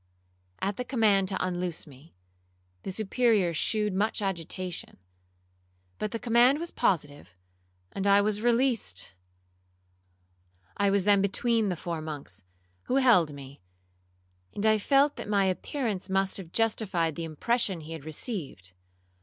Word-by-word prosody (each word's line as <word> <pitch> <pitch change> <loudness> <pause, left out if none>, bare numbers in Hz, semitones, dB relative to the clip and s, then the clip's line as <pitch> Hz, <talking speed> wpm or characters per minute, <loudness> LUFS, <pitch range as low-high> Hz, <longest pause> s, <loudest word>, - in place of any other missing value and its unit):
At 200 +1 -1
the 250 - -2
command 215 -6 +2
to 190 - -1
unloose 180 -2 -3
me, 140 - -17 0.7
the - - -5
Superior 215 -2 +1
shewed 210 +5 0
much 205 +4 0
agitation; 185 -2 -4 1.0
but 215 - -2
the 230 - -3
command 240 +4 +4
was 335 +2 -5
positive, 145 - -1 0.6
and 195 0 -2
I 200 0 +6
was 210 0 0
released. 235 - 0 1.6
I 200 0 +2
was 200 -1 +2
then 200 0 +4
between 220 +2 +1
the 180 - -1
four 165 -1 -4
monks, 145 - -7 0.4
who 255 - -1
held 235 - +5
me, 140 -3 -11 0.9
and 205 - -2
I 215 0 +4
felt 280 +6 +3
that - - -6
my 200 -2 +3
appearance 200 +1 -2
must 195 0 +1
have 180 -4 -9
justified 195 -7 0
the 170 - -5
impression 185 +3 0
he 160 +1 -8
had 160 -3 -8
received. 155 - -5
195 Hz, 135 wpm, -28 LUFS, 165-225 Hz, 1.6 s, I